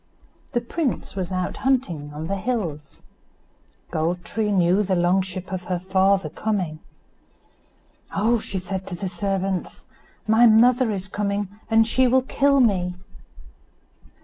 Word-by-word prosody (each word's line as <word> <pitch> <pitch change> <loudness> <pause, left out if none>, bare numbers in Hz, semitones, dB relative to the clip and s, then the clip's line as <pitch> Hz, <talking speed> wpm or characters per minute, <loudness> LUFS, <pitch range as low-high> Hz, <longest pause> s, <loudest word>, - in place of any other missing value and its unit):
The 240 - +1
prince 270 -1 -3
was 185 -2 -3
out 185 -1 -2
hunting 190 - -1
on 150 +2 -6
the 195 - -2
hills. 180 - -4 0.9
Gold 170 +3 -1
tree 215 -1 -1
knew 185 0 +3
the 190 -2 0
long 175 +2 +3
ship 185 0 -6
of 185 -1 -4
her 180 0 -1
father 190 +2 +2
coming. 185 -8 -2 1.4
"Oh!" 225 +4 +2
said 190 -2 -4
she 190 - -20
to 180 - -5
the 190 +2 -4
servants, 190 +1 -3 0.4
"my 225 +2 +6
mother 235 +2 +5
is 195 -2 -3
coming, 200 -1 -2 0.2
and 225 0 +4
she 255 +2 +3
will 260 +1 +3
kill 275 +1 +2
me." 185 -7 +2
195 Hz, 140 wpm, -23 LUFS, 180-225 Hz, 1.4 s, my